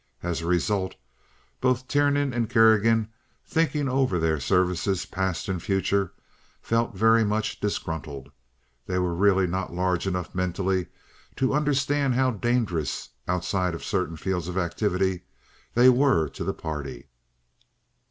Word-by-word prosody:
As 85 -1 -2
a 85 - -4
result 95 +2 0 0.6
both 130 0 +1
Tiernan 145 -1 +2
and 115 -2 -1
Kerrigan, 110 -1 +4 0.4
thinking 155 -3 0
over 130 -7 +1
their 80 -2 +1
services, 90 +4 +1
past 95 -2 -2
and 95 -3 -2
future, 95 0 0 0.5
felt 115 -2 -1
very 115 +3 +4
much 110 +1 -1
disgruntled. 75 -8 -4 0.6
They 90 - -1
were 90 -1 0
really 95 +1 +3
not 90 0 -3
large 90 0 0
enough 90 -3 -3
mentally 90 0 -1 0.5
to 135 0 +1
understand 145 -2 +1
how 130 0 +3
dangerous—outside 90 - -1
of - - -8
certain 80 +1 -1
fields 90 -1 -2
of 90 +1 -4
activity—they 95 +6 0
were 125 - +3
to - - -6
the - - -1
party. 70 -5 -6
95 Hz, 125 wpm, -26 LUFS, 90-120 Hz, 0.6 s, Kerrigan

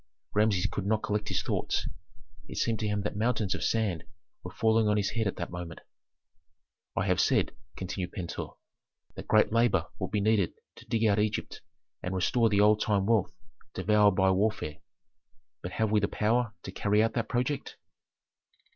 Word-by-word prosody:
Rameses 105 -3 +2
could 100 -1 -2
not 110 0 +1
collect 105 0 -1
his - - 0
thoughts. - - -1 0.6
It - - -8
seemed 115 -2 0
to 110 - -1
him 105 -1 -1
that 105 - -3
mountains 110 -2 0
of - - -4
sand 105 -8 0 0.4
were 90 - -7
falling 110 +2 +2
on 105 0 +2
his 100 -1 0
head 110 -3 0
at 100 - -2
that 85 - -5
moment. 85 -2 -7 1.2
"I - - +1
have - - +2
said," - - +2 0.3
continued 95 -1 -4
Pentuer, 90 -4 -5 0.6
"that - - -9
great - - +4
labor 115 -7 +3
would - - -2
be 105 - 0
needed 100 -3 +2 0.2
to - - -14
dig 115 -1 +1
out 105 -1 +3
Egypt 105 0 -2 0.4
and 90 +1 -3
restore 115 +5 +2
the 100 -1 +3
old 105 +1 +5
time 100 -3 +1
wealth 110 -4 +2 0.4
devoured 105 +1 +4
by 95 0 +4
warfare. 95 -6 0 0.8
But 90 - -6
have 110 -2 0
we 110 - +4
the 100 - +1
power 115 +1 0
to 95 - -6
carry 105 +2 +2
out 115 0 0
that 115 -2 -2
project?" 130 +3 -2
105 Hz, 180 wpm, -29 LUFS, 95-110 Hz, 1.2 s, old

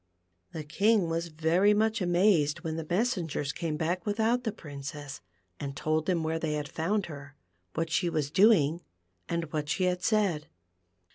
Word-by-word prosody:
The 155 - -5
king 195 +4 +2
was 165 +1 -1
very 170 +6 +3
much 220 +1 +1
amazed 175 -4 +3
when 160 -2 -3
the 165 - -3
mes 220 +10 +1
sengers 155 -5 -3
came 160 -3 -3
back 170 +3 -1
without 225 +4 +1
the 220 - 0
Princess, 145 -5 -8 0.4
and 140 -1 -5
told 155 0 0
liim 175 -3 +1
where 160 +1 -1
they 160 -2 -1
had 150 -1 -2
found 195 +5 -1
her, 145 -2 -10 0.4
what 165 0 -1
she 175 +2 +1
was 150 -3 -1
doing, 175 -5 +4 0.5
and 170 -2 -3
what 150 -1 -2
she 185 - 0
had 180 0 +1
said. 185 -7 +1
165 Hz, 170 wpm, -29 LUFS, 155-195 Hz, 0.5 s, doing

